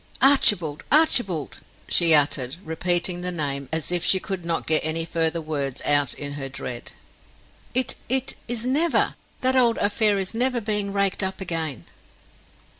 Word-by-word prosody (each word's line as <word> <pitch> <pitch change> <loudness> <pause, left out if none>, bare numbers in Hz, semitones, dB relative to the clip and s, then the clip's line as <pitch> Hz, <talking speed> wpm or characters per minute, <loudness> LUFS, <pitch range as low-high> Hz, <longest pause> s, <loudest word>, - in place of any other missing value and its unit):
"Archibald, 205 - +3
Archibald!" 225 - +2 0.3
she 170 -2 +5
uttered, 140 -2 0
repeating 175 +2 0
the 180 0 -1
name, 140 -5 -4
as 160 +1 0
if 175 -1 +2
she 190 - +4
could 190 -2 -5
not 170 -1 -2
get 155 0 +5
any 160 +1 0
further 165 0 0
words 145 -4 -4
out 145 -2 +2
in 145 -1 -4
her 135 -2 -4
dread. 125 -2 -7 0.8
"It 255 -1 +2 0.2
it 265 +1 -1
is 240 -1 -1
never 305 +6 +1 0.3
that 260 +1 +1
old 240 -3 +3
affair 205 0 +2
is 190 +1 -3
never 250 +2 0
being 210 -2 -3
raked 200 0 0
up 190 0 -3
again?" 165 - -4
175 Hz, 155 wpm, -23 LUFS, 155-215 Hz, 0.8 s, she